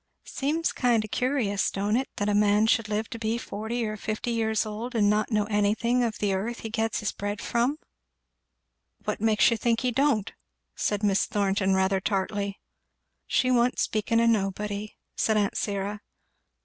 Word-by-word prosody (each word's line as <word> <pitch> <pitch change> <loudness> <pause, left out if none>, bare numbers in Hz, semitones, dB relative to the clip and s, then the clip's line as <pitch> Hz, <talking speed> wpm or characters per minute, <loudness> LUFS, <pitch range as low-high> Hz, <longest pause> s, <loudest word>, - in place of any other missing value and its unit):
"It - - -11
seems 310 +4 0
kind 235 -4 +2
o' - - -8
curious, 235 -4 0
don't 205 +2 -1
it, 260 +2 0
that 205 - -1
a 210 - +2
man 210 +1 +4
should 225 -1 +2
live 215 +1 -1
to 230 - -6
be 225 +1 -1
forty 230 +1 -3
or 215 0 -3
fifty 215 +3 -3
years 220 -2 +1
old 225 +4 -5
and 205 -2 +4
not 215 +1 +1
know 215 -3 +2
anything 215 +4 +1
of 225 -2 -1
the 205 -2 0
earth 220 +5 -3
he 225 - -6
gets 225 +1 -1
his 210 - -1
bread 205 +1 -4
from?" 245 +5 0 1.3
"What - - -2
makes 220 +1 +4
you 230 - +1
think 230 0 +1
he 250 0 +1
don't?" 245 -5 +1 0.4
said 205 0 -1
Miss 200 -1 +2
Thornton 195 -1 +1
rather 190 0 +2
tartly. 200 0 -2 0.7
"She 255 -1 +2
wa'n't 245 0 +3
speaking 220 +1 +1
o' 230 - +3
nobody," 210 -1 -1 0.2
said 220 -1 +1
aunt 205 -1 +1
Syra. 205 0 -2
215 Hz, 180 wpm, -27 LUFS, 205-235 Hz, 1.3 s, man